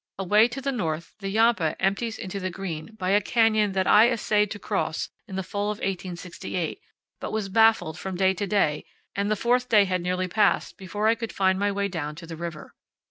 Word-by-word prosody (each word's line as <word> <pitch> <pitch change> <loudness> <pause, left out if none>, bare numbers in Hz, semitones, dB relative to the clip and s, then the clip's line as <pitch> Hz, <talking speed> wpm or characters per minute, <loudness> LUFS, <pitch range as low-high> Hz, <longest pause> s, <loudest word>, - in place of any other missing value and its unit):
Away 210 +4 +4
to 245 +3 -6
the 275 +1 -1
north 170 -9 -3
the 195 -1 -4
Yampa 215 -6 +2
empties 210 +4 0
into 190 +1 -5
the 185 -1 -2
Green 180 +1 -6
by 185 -1 -1
a 205 +1 +4
canyon 215 -2 +2
that 190 -1 +1
I 220 +5 +6
essayed 210 -3 +1
to 210 - -5
cross - - -2 0.2
in 190 - -7
the 190 - -2
fall 200 +2 -3
of 210 0 -2
1868, 180 - -4 0.4
but - - -5
was 215 -3 -2
baffled 220 -6 +3
from 190 -1 -5
day 190 +1 +3
to 200 +2 -3
day, 165 -7 +1 0.3
and 200 +1 0
the 215 - +2
fourth 245 +3 +1
day 210 -3 +6
had 185 -2 -1
nearly 180 +1 -1
passed 210 +4 +1
before 205 +2 -2
I 225 - +5
could 230 -1 -5
find 190 -1 +1
my 205 0 +1
way 200 0 -1
down 155 -5 -4
to 165 +2 -10
the 165 0 -7
river. 165 -1 -7
195 Hz, 215 wpm, -25 LUFS, 185-215 Hz, 0.4 s, I